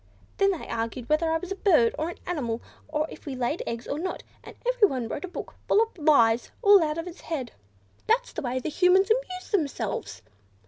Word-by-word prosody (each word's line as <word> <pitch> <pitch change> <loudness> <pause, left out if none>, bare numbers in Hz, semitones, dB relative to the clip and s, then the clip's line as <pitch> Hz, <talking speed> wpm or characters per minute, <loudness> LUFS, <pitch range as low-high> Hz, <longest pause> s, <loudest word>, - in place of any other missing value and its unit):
Then 395 0 +4
they 370 -5 -3
argued 230 +1 -3
whether 315 +2 +2
I 325 - +2
was 365 +3 -8
a - - -1
bird, 320 - +4
or 315 +2 -2
an - - -8
animal, 245 -10 -2 0.3
or 305 0 0
if - - -12
we 275 - -3
laid 255 +6 -1
eggs, 230 0 -4
or 285 - -2
not; 370 +3 -4 0.2
and - - -11
everyone 410 - +2
wrote 300 - -4
a - - -8
book, 360 - -7
full - - +4
of 450 0 +1
lies, 265 -8 +4
all 405 -2 +8
out 305 -1 0
of 330 - -3
his 355 0 -9
head. 265 -8 -4 0.6
"That's - - +1
the - - -4
way 255 -1 -1
Humans 365 +5 +4
amuse 370 -6 -1
themselves. 230 - -2
320 Hz, 210 wpm, -26 LUFS, 250-375 Hz, 0.6 s, all